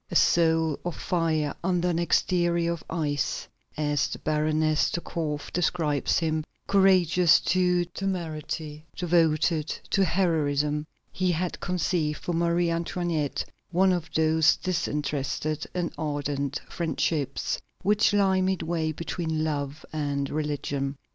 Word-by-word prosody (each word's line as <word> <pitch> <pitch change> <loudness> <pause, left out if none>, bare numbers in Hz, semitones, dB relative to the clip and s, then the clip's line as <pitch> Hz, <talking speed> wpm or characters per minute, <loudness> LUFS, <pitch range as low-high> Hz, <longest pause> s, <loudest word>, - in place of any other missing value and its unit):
A - - -5
soul 160 -2 +3
of 175 -2 -3
fire 160 -5 0
under 180 -1 +1
an 170 -1 0
exterior 170 +1 +2
of 170 - -8
ice, 145 -4 -1 0.3
as 145 -2 +1
the - - -5
Baroness 155 0 +1
de - - -2
Korff 150 -4 -4
describes 160 -4 +1
him, 160 -1 0 0.2
courageous 180 -3 +5
to 180 0 +2
temerity, 160 -4 -4
devoted 165 -2 +2 0.2
to 195 - +3
heroism, 150 -5 +1 0.2
he 185 -1 0
had 175 +2 -2
conceived 175 -4 0
for 175 - -4
Marie 170 0 +1
Antoinette 165 -3 -1 0.2
one 185 +2 +3
of 165 -3 -3
those 160 0 +4
disinterested 150 -3 -2
and 175 -2 -1
ardent 145 -2 -2
friendships 155 -4 -1 0.2
which 205 +2 +3
lie 195 -2 +3
midway 170 -4 0
between 160 0 -3
love 145 -1 -3
and 145 -2 -2
religion. 145 -2 -2
160 Hz, 120 wpm, -27 LUFS, 150-175 Hz, 0.3 s, courageous